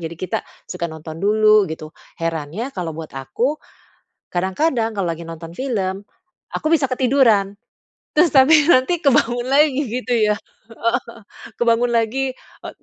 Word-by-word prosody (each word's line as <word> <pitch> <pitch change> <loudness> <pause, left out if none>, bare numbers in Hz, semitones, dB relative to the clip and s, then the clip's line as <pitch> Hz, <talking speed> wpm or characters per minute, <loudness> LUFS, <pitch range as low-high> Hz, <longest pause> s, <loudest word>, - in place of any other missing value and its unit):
jadi 165 0 -6
kita 185 +2 -3 0.2
suka 170 -2 -4
nonton 160 0 -9
dulu, 215 -1 +4
gitu. 160 0 -7 0.2
Herannya 165 - -4
kalau 170 -6 -5
buat 160 -1 -8
aku, 180 - -2 0.7
kadang-kadang 225 - 0
kalau 195 - 0
lagi 165 0 -8
nonton 165 0 -8
film, 200 -4 -3 0.4
aku - - -4
bisa 300 -5 +3
ketiduran. 250 -6 +3 0.6
Terus, 315 +3 +4
tapi 295 +3 +6
nanti 320 +4 +3
kebangun 245 -4 +2
lagi 285 0 +3
gitu 250 +1 -3
ya, 210 -2 +2
heeh 230 +2 -4
heeh. 230 0 -12 0.4
Kebangun 235 0 +2
lagi, 245 +4 0
e - - -14
225 Hz, 140 wpm, -20 LUFS, 175-260 Hz, 0.7 s, tapi